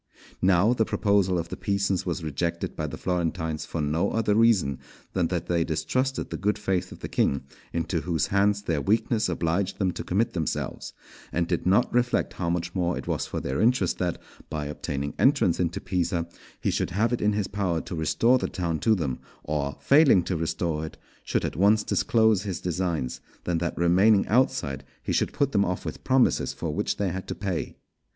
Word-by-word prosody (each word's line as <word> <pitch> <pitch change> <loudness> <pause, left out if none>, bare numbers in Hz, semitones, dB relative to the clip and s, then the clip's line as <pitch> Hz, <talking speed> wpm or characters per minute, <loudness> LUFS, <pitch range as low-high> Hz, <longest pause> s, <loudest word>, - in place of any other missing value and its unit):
Now 95 +5 +4
the 115 - +2
proposal 100 -4 +2
of 85 0 -3
the - - -4
Pisans 100 -2 -1
was 85 -1 -2
rejected 85 +3 -2
by - - -2
the - - -6
Florentines 80 -3 -2
for 80 - -3
no 75 +3 +1
other 110 -2 +1
reason 105 - +3 0.3
than 90 -3 +1
that 90 -2 -2
they 85 -1 +1
distrusted 130 - -1
the - - -3
good 105 +2 +1
faith 95 -3 -1
of - - -11
the - - -4
King, 70 -1 +1 0.3
into 85 0 -1
whose 80 -3 0
hands 100 +1 +3
their 80 -6 0
weakness 110 - +1
obliged 85 +3 -1
them 95 -3 +1
to - - -6
commit 105 +6 0
themselves, 80 -4 -3 0.4
and 85 0 0
did 85 0 -1
not 100 +6 +3
reflect 125 0 +1
how 85 -2 -2
much 85 0 -2
more 90 -2 0
it - - -6
was - - -2
for - - -3
their 65 +2 -2
interest 115 -6 +2
that, 90 -2 -1 0.3
by 75 -1 -3
obtaining 70 -1 -4
entrance 135 - +3
into 90 +2 0
Pisa, 85 -3 -1 0.3
he - - 0
should - - -1
have 110 +6 +1
it 120 - -1
in 105 0 +2
his 105 -1 0
power 95 -5 -1
to - - -8
restore 115 +10 +3
the - - -2
town 85 -4 -2
to 110 -1 +3
them, 70 -9 -2 0.2
or, 70 -2 -2
failing 140 - +6
to 90 - -2
restore 80 -1 -1
it, 80 - -7 0.3
should - - -1
at - - -3
once 105 +4 +4
disclose 110 -2 +3
his 100 -4 -4
designs, 85 -7 -2 0.2
than 85 -2 0
that 85 0 -2
remaining 95 +5 +4
outside 110 - +1 0.2
he - - -2
should - - +1
put 140 -1 0
them 100 -4 +3
off 90 -1 -2
with - - -6
promises 130 -1 +2
for - - -4
which - - -1
they 100 -2 0
had 95 +2 -5
to - - -4
pay. 95 -5 -3
90 Hz, 200 wpm, -26 LUFS, 85-105 Hz, 0.4 s, failing